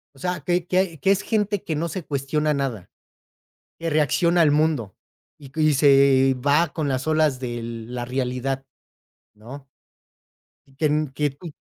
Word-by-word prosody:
o - - -18
sea, 180 +1 -3
que 175 +4 0
que 180 -4 0
que 195 - +2
es 200 +1 +2
gente 210 -3 -1
que 160 - -3
no 165 +3 -1
se 185 +1 -5
cuestiona 150 +2 -1
nada. 130 -10 -3 0.9
Que 165 0 -3
reacciona 170 +3 +2
al 155 - +4
mundo 150 - 0 0.4
y, 145 - -13
eh, - - -22
y 155 -1 +4
se 135 -1 +5
va 155 +4 +4
con 155 -3 -2
las 130 0 -2
olas 155 -4 +2
de 120 -2 -4
la 115 +1 -6
realidad, 130 +1 -3 0.7
¿no? 130 +6 -11 1.1
Que 150 +1 +1
que 150 +1 0
tu 155 +5 -10
145 Hz, 160 wpm, -23 LUFS, 130-160 Hz, 1.1 s, se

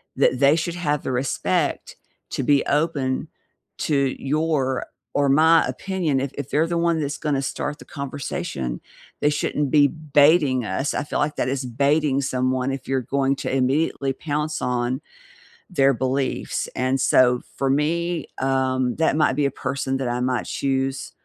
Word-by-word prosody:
that 130 - +2
they 140 +2 +5
should 170 +1 -2
have 150 -5 -1
the - - -2
respect 130 +2 -1 0.4
to - - -2
be 140 +1 +3
open 145 -4 0 0.5
to 150 - 0 0.3
your, 140 -3 0 0.3
or 145 -1 +2
my 160 +4 +5
opinion. 180 -8 -1
If 135 0 -3
if 140 -1 -5
they're 155 +3 +2
the 170 0 -1
one 170 -1 +1
that's 145 0 -3
gonna 145 -3 0
start 145 +2 -3
the - - -12
conversation, 135 - -4 0.4
they 145 - +4
shouldn't 150 -1 -1
be 145 -2 +6
baiting 145 -3 +3
us, 105 +9 -1
I - - -1
feel 145 - -3
like 145 +1 0
that - - 0
is 135 0 -2
baiting 140 +3 +2
someone 130 0 0
if 135 0 -6
you're 135 -1 0
going 135 +2 0
to 135 - -2
immediately 135 +1 +1
pounce 150 +1 -3
on 125 +2 -1 0.7
their 135 -5 +4
beliefs, 130 +2 -1
and 130 +1 0
so, 125 -1 +4
for 135 - 0
me, 165 +3 0
um, 130 -1 +1
that 160 -3 +2
might 155 -4 +2
be 145 0 +1
a 140 - +1
person 135 +1 -2
that 135 -1 -2
I 120 0 -1
might 125 0 -1
choose 135 0 -2
140 Hz, 165 wpm, -23 LUFS, 130-150 Hz, 0.7 s, be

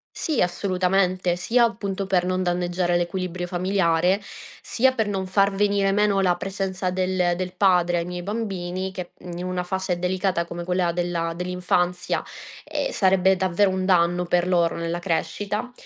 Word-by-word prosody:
Sì 310 -6 -1
assolutamente, 185 0 +1
sia 235 +7 +3
appunto 200 -3 -3
per 185 -2 +2
non 185 0 0
danneggiare 175 0 0
l'equilibrio 175 0 -3
familiare, 180 0 +1 0.4
sia 260 +3 +2
per 220 -4 0
non 190 -2 -2
far 195 +1 +3
venire 200 0 +2
meno 205 -1 +2
la 180 -2 +3
presenza 190 0 -3
del 185 -1 +1
del 180 0 -4
padre 180 -2 +3
ai 170 - -3
miei 180 0 -5
bambini 190 -3 -3
che, 180 -2 -7
mhmm, 175 -1 -8
in 180 - -4
una 185 -1 -2
fase 190 -1 -2
delicata 180 -1 0
come 170 0 -6
quella 180 0 0
della 170 -1 -2
dell'infanzia, 180 0 -1 0.4
ehm, - - -3
sarebbe 190 - +3
davvero 190 +1 +2
un 185 0 -1
danno 175 -1 +3
per 175 0 +1
loro 170 -2 +2
nella 170 0 -2
crescita; 205 +6 -2
185 Hz, 160 wpm, -24 LUFS, 175-195 Hz, 0.4 s, sia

